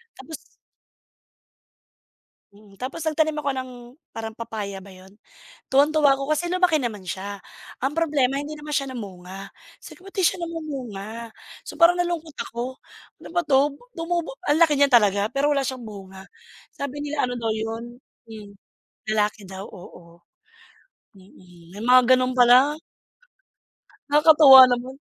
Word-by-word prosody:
Tapos 320 - -9 2.2
Mm, 205 -1 -19
tapos 255 +9 -6
nagtanim 310 0 0
ako 285 -1 -2
ng 255 0 -5 0.4
parang 225 -1 -7
papaya 205 -4 -6
ba 200 - -14
yun? 190 +1 -16 0.5
Tuwang-tuwa 285 +1 +3
ako 275 +2 -5
kasi 310 +3 0
lumaki 360 -2 +2
naman 230 -7 -4
siya. 195 +2 -6 0.4
Ang 270 - +1
problema, 290 -4 0
hindi 290 +2 -6
naman 300 0 -10
siya 275 -3 -2
namunga. 195 -2 -9 0.3
Sabi - - -12
ko, 375 - -18
"Ba't 390 - -13
di 385 - -1
siya 345 - +2
namumunga?" 240 -9 -7 0.4
So, - - -8
parang 345 +1 +4
nalungkot 335 -3 -3
ako. 245 +3 -5 0.4
"Ano - - -12
ba 345 - +2
'to?" 280 -1 +2 0.2
Tumubo, 345 +8 -3
ang 305 +3 +3
laki 300 -3 +3
niya 285 - +5
talaga. 205 -6 +3
Pero 285 +2 +1
wala 275 -2 0
siyang 255 -2 -5
bunga. 195 -3 -11 0.5
Sabi 280 +1 -6
nila, 295 -2 -1
ano 245 - -4
daw, 230 -2 -3
yun, 225 +2 -5 0.3
hmm, 210 -2 -10 0.6
lalaki 210 -1 -1
daw, 190 +1 -8
oo. 170 -3 -14 1.0
Mm, 180 -3 -19
may 210 - -7
mga 255 +1 +7 0.2
gano'n 255 0 -1
pala. 255 +3 +5 1.4
Nakakatuwa 295 -3 +8
naman. 250 +2 -3
255 Hz, 145 wpm, -23 LUFS, 210-300 Hz, 2.2 s, Nakakatuwa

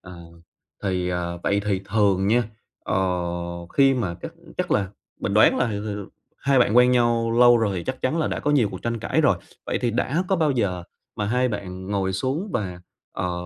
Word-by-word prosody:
Ờ. 90 - -12 0.7
Thì, 90 -3 -1
ờ, 85 -1 -3
vậy 100 0 +1
thì 100 -2 0
thường 100 -2 +2
nha, 120 +4 +3 0.4
ờ, - - -1 0.8
khi 135 -1 +5
mà 100 -9 -2
chắc - - -6 0.3
chắc - - -1
là 100 -2 +1 0.3
mình 100 - -2
đoán 110 - +6
là, - - +2
ừm, 105 +1 -4
ừm, 100 -1 -5 0.3
hai 140 -1 +2
bạn 120 -2 +3
quen 125 0 +7
nhau 120 -2 +2
lâu 120 -1 +7
rồi, 105 -4 0
thì 85 - -4
chắc 130 0 -4
chắn 155 +6 0
là 155 - +1
đã - - -3
có 145 - 0
nhiều 130 -8 +3
cuộc 95 - -8
tranh 115 -1 -2
cãi - - 0
rồi. - - +3 0.3
Vậy - - -1
thì 120 - +1
đã 135 - 0
có 190 - +2
bao 155 -3 +2
giờ 100 -9 -1 0.3
mà 105 - -1
hai 125 +4 +1
bạn 95 -3 -6
ngồi 95 -2 -1
xuống 135 - -2
và, 90 -4 -3 0.3
ờ, 90 -1 -2
105 Hz, 215 wpm, -24 LUFS, 95-125 Hz, 0.8 s, quen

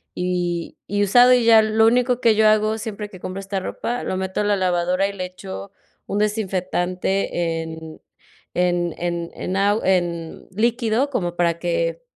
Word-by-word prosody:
Y 175 -1 -2
y 205 0 0
usado, 245 +5 +6
y 245 -2 +3
ya 225 -1 +7
lo 220 +1 +3
único 250 +1 +2
que 230 -3 +4
yo 215 0 +4
hago 215 0 +3
siempre 210 -1 -5
que 185 - -12
compro 185 +1 -5
esta 195 0 -3
ropa, 240 +5 -3
lo 185 - -2
meto 190 +1 -2
a - - 0
la 205 0 +2
lavadora 180 +1 +1
y 200 - -6
le 185 -2 -4
echo 190 +1 -8 0.4
un 200 - -2
desinfectante, 185 -4 -1
en 160 -1 -9 0.5
en 175 -1 +1
en 170 -1 -3
en 185 - -4
agu 205 +2 +2
en 175 -3 -1
líquido 230 +5 +1
como 175 -9 -2
para 170 -1 +1
que - - -1
195 Hz, 175 wpm, -22 LUFS, 175-220 Hz, 0.5 s, ya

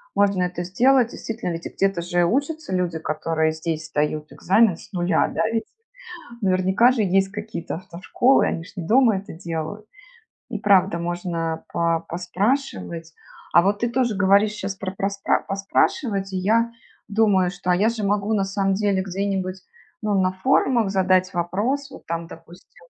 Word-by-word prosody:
можно 200 -2 +3
это 180 -1 -3
сделать. 245 +6 +3
Действительно, 220 -6 -5
ведь, 165 - -7
и - - -9
где-то 195 -3 0
же 175 0 +1
учатся 285 - -1
люди, 170 -3 -1
которые 160 0 -1
здесь 160 0 -4
сдают 150 0 -2
экзамен 195 -1 +3
с - - -15
нуля, 175 -2 +1
да, 215 - 0
ведь? 225 -1 -1 0.8
Наверняка 190 +6 +3
же 230 -4 0
есть 195 0 +2
какие-то 210 -5 -5
автошколы, 185 +9 +1
они 165 - -2
же - - -14
не 170 -3 -5
дома 230 -2 +4
это 195 - -7
делают. 165 +5 -5 0.6
И 215 - -3
правда, 195 -4 +3
можно 170 -1 -3
по 165 -1 +1
поспрашивать. 180 - -2 0.4
А 170 - +8
вот 200 +2 +1
ты 235 - +1
тоже 240 -2 +1
говоришь 200 +2 +4
щас 195 -2 -4
про 190 -1 -4
проспра 195 +1 0
поспрашивать, 195 +1 0
и - - 0
я 225 +5 +2 0.4
думаю, 200 -4 +3
что, 180 0 -4
а, 180 - +4
я 210 +4 +3
же 225 -3 -2
могу 205 +2 +1
на 195 -2 +1
самом 195 0 0
деле 200 -2 +1
где-нибудь, 190 0 -3 0.4
ну, 210 -1 0
на 185 0 +2
форумах 235 0 +2
задать 185 -1 +2
вопрос, 220 +12 -1
вот 270 - -12
там, 170 0 -3
допустим. 165 - -15
190 Hz, 165 wpm, -23 LUFS, 175-215 Hz, 0.8 s, А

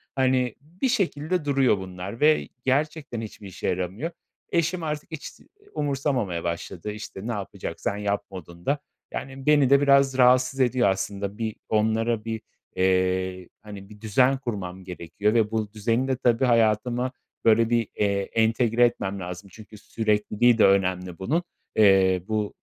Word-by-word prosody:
Hani, 130 -2 +1
bir 175 - -3
şekilde 180 - 0
duruyor 135 -6 +3
bunlar 95 +3 -7
ve 155 +1 +3 0.2
gerçekten 140 -3 -1
hiçbir 105 -2 -9
işe 95 - -5
yaramıyor. 95 - -2 0.4
Eşim 170 +1 0
artık 150 +1 -4
hiç 160 - -6
s - - -10 0.3
umursamamaya 135 - -1
başladı. 85 +3 -4
İşte, 105 0 -8
"Ne - - -1
yapacaksan 100 0 -4
yap" 105 0 -1
modunda. 90 - -4 0.3
Yani, 135 0 -6
beni 145 -3 +5
de 140 +1 +6
biraz 140 -1 +4
rahatsız 130 +1 +4
ediyor 125 -4 +3
aslında. 100 +1 -3
Bir 110 -2 -3
onlara 110 +1 +1
bir, 110 -1 -3 0.3
eee, 95 0 +1
hani, 100 -2 -10
bir 105 -1 -14
düzen 125 +5 +3
kurmam 95 -8 -5
gerekiyor 90 +4 -2
ve 110 -2 +2
bu 110 -2 -2
düzeni 115 +4 0
de 130 -1 0
tabii 120 0 +2
hayatıma, 120 +2 +2 0.3
böyle, 115 0 +5
bir, 115 -2 +1
eee, 100 -1 +1
entegre 115 +1 +3
etmem 100 -4 -2
lazım 90 +2 -7
çünkü 110 -1 -13
sürekliliği 110 +2 +1
de - - +6
önemli 90 -2 +1
bunun. 155 - 0 0.3
Eee, 95 -4 +5
bu 110 -2 -1
110 Hz, 150 wpm, -25 LUFS, 100-130 Hz, 0.4 s, de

